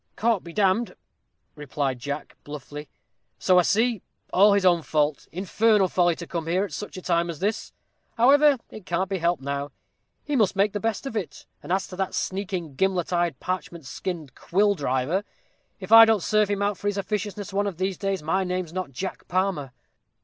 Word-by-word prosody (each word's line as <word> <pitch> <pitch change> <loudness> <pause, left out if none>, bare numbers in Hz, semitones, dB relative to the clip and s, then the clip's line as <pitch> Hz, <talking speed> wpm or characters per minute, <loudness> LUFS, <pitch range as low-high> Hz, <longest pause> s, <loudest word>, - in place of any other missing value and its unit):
"Caught 225 -3 +1
be 170 - -9
d 205 +4 0 0.2
d," - - -11 0.6
replied 140 -3 -3
Jack, 145 +4 -5
bluffly; 145 0 -8 0.5
"so 185 -1 +4
I - - +6
see; 220 +3 +1 0.3
all 200 +2 +6
his 200 -1 +2
own 175 -2 +4
fault; 150 -2 0
infernal 200 +2 +2
folly 175 -1 +2
to 170 - -8
come 165 -2 -4
here, 185 +4 +1
at 200 - -10
such 210 - -6
a 185 - -8
time 170 -1 +1
as 165 - -5
this. 205 +6 -2 0.5
However, 280 +4 +6
it 215 -5 -11
can't 185 +3 -1
be 190 - -1
helped 170 -4 0
now; 140 +1 -3 0.5
he 295 - -2
must 215 -6 +2
make 200 +1 +2
the 205 - -2
best 225 +3 -2
of 270 - -5
it. 200 -7 -5 0.2
And - - -8
as 190 0 +1
to 185 - -10
that 190 -1 -2
sneaking, 185 -5 -3
gimlet 185 +3 0
eyed, 175 -5 0
parchment 175 -4 -4
skinned 160 -3 -5
quill 205 +7 +1
driver, 145 +3 -1 0.6
if - - -9
I 225 0 +11
don't 220 -5 +2
serve 215 -1 +2
him 200 0 0
out 205 -1 -1
for 205 - -3
his 205 0 0
officiousness 205 0 -3
one 205 +1 +1
of 190 -5 -4
these 190 0 -2
days, 195 -4 -2
my 190 +5 +1
name's 180 -2 -3
not 185 -4 -3
Jack 185 +9 -6
Palmer." 185 -7 -1
185 Hz, 200 wpm, -25 LUFS, 165-205 Hz, 0.6 s, I